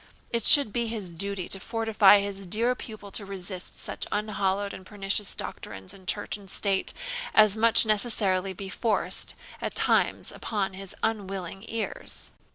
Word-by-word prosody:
It 230 -2 0
should 280 -8 +8
be 235 -1 0
his 215 -6 -4
duty 195 +2 -3
to 195 - +1
fortify 220 -3 +4
his 200 -1 -3
dear 230 +6 +2
pupil 215 -4 -9
to 205 - -2
resist 190 -2 -5
such - - -3
unhallowed 200 -1 -1
and 190 - -9
pernicious 200 +1 -1
doctrines 95 -2 -7
in 190 -1 -15
church 205 +1 -1
and 200 -2 -14
state 195 0 +1 0.4
as 215 -2 +6
must 225 +1 +5
necessarily 200 -3 +1
be 195 +2 -6
forced 190 -2 -1 0.3
at - - -3
times - - +2
upon 195 -3 -3
his 195 0 -6
unwilling 195 -3 -3
ears. 225 -1 -2
200 Hz, 155 wpm, -27 LUFS, 190-215 Hz, 0.4 s, should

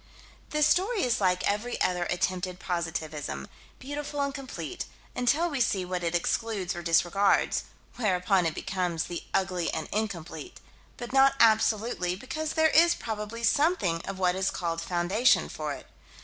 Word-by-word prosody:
The 300 0 +1
story 385 +8 +3
is 240 -4 +1
like 180 -1 +2
every 210 +4 -1
other 180 -1 +1
attempted 180 0 -1
positivism 155 - -3 0.3
beautiful 290 +2 -5
and 280 -1 -1
complete, 275 -2 -6 0.3
until 285 +8 +2
we 285 -6 -2
see 190 -5 +1
what 180 -1 -3
it 170 0 0
excludes 195 +1 -1
or 175 - -5
disregards; 175 +4 +2 0.3
whereupon 185 -4 +2
it 160 - -3
becomes 180 -4 -2
the 175 - -6
ugly 180 -3 0
and - - -3
incomplete 175 -8 -4 0.4
but 240 +1 -7
not 270 0 +5
absolutely, 220 -4 +3
because 265 +9 -4
there 315 -1 +4
is 340 +2 +5
probably 220 +1 -5
something 230 - +2
of 195 - -5
what 180 -1 +2
is 190 +1 0
called 165 -1 -3
foundation 180 +8 +2
for - - -4
it. - - -7
195 Hz, 150 wpm, -28 LUFS, 175-250 Hz, 0.4 s, not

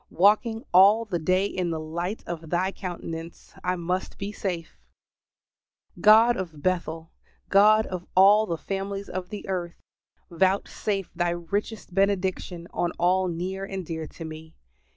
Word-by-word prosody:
Walking 220 +5 +3
all 205 +5 +7
the 185 -5 -2
day 185 +4 +2
in 185 -3 -2
the 160 -1 -2
light 170 +6 -4
of 165 -2 -6
Thy 180 +3 +1
countenance, 170 -3 -7
I 180 - 0
must 180 +2 -3
be 200 +1 -4
safe! 180 -5 -4 1.2
God 225 +3 +7
of 160 -7 -6
Bethel 165 -3 -2 0.4
God 215 +2 +6
of 180 -1 -6
all 205 +3 +6
the 170 - -2
families 195 +2 -4
of 185 0 -5
the 210 0 -7
earth, 175 -3 -3 0.6
vouchsafe 195 +2 0
Thy 175 0 0
richest 190 +4 -4
benediction 185 -3 0
on 175 - -1
all 185 +2 +2
near 180 +3 -3
and 195 -2 -5
dear 160 -1 -5
to 165 - -9
me. 160 0 -10
185 Hz, 145 wpm, -26 LUFS, 170-200 Hz, 1.2 s, all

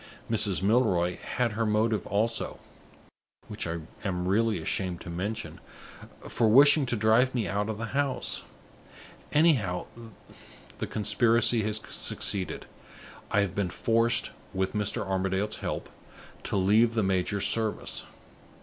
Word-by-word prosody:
Mrs. 100 -4 +1
Milroy 95 -6 +2
had 125 -2 -2
her 110 +2 -1
motive 110 0 +1
also 115 +3 -1 0.9
(which - - -5
I 85 0 -3 0.2
am 90 -3 -2
really 110 +2 +2
ashamed 90 +1 -2
to 85 - -7
mention) 100 +6 -4 0.7
for 115 - +2
wishing 140 +4 +6
to 120 - 0
drive 115 +4 +3
me 115 -4 0
out 105 +1 -1
of 110 - -3
the 115 - -4
house. 140 -1 -1 0.9
Anyhow, 130 - +2 0.9
the - - -3
conspiracy 115 +2 +2
has 110 0 0
succeeded. 95 -2 -3 0.6
I 105 - +3
have 100 -4 -1
been 100 -3 -1
forced 115 +4 +1 0.2
(with 95 0 -1
Mr. 105 -2 -1
Armadale's 95 +1 -1
help) - - -4 0.6
to - - -1
leave 110 +5 +3
the 110 - +2
major's 95 +1 0
service. 110 -2 -1
105 Hz, 130 wpm, -28 LUFS, 95-115 Hz, 0.9 s, wishing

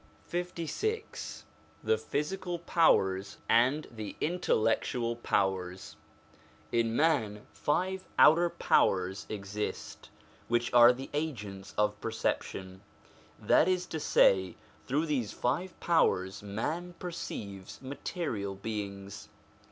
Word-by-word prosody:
LVI 180 - -3 0.4
THE 450 - +3
PHYSICAL 175 +4 -2
POWERS 100 - +2
AND 130 +7 +3
THE 110 -3 -7
INTELLECTUAL 120 -6 0
POWERS 95 -4 -1 0.8
IN 115 -1 +1
man 115 -10 +1
five 185 +5 -1
outer 170 +3 +7
powers 95 - +1
exist, 105 0 -5 0.4
which 120 0 0
are 120 0 +9
the 130 +2 -7
agents 105 -11 -4
of 105 0 +1
perception; 95 -4 -3 0.6
that 160 - +4
is 180 -1 +1
to 160 - -4
say, 95 - +4 0.3
through 145 +5 +1
these 125 -9 -1
five 170 +9 -2
powers 95 - +2
man 155 - -4
perceives 100 - -6
material 130 - -4
beings. 100 -1 -6
120 Hz, 95 wpm, -30 LUFS, 100-160 Hz, 0.8 s, are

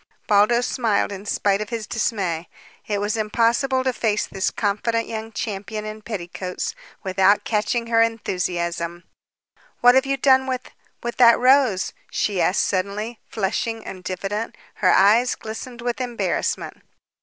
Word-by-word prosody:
Baldos 215 +4 +4
smiled 225 -6 0
in 200 +1 -7
spite 200 0 +1
of 215 - -5
his 230 -2 -4
dismay. 190 -7 -2 0.4
It 205 - 0
was 205 +2 -1
impossible 235 +5 +1
to 260 -1 0
face 215 -3 0
this 195 0 -1
confident 230 +2 -1
young 220 0 -5
champion 215 0 -4
in 215 0 -7
petticoats 190 - -4 0.3
without 190 +1 +3
catching 230 +2 0
her 230 -1 +3
enthusiasm. 175 -6 -1 0.8
"What 245 0 +7
have 265 +1 +3
you 275 0 0
done 265 0 +4
with 255 -1 -4 0.3
with 240 0 -4
that 235 -2 +7
rose?" 255 -6 +3 0.2
she 200 -4 0
asked 185 - +2
suddenly, 205 +4 -2
flushing 220 +2 -2
and 185 -1 -8
diffident. 195 +4 -4 0.2
Her - - +2
eyes 225 +6 +5
glistened 235 +3 -8
with 245 +1 -2
embarrassment. 245 -2 -2
220 Hz, 145 wpm, -22 LUFS, 200-240 Hz, 0.8 s, What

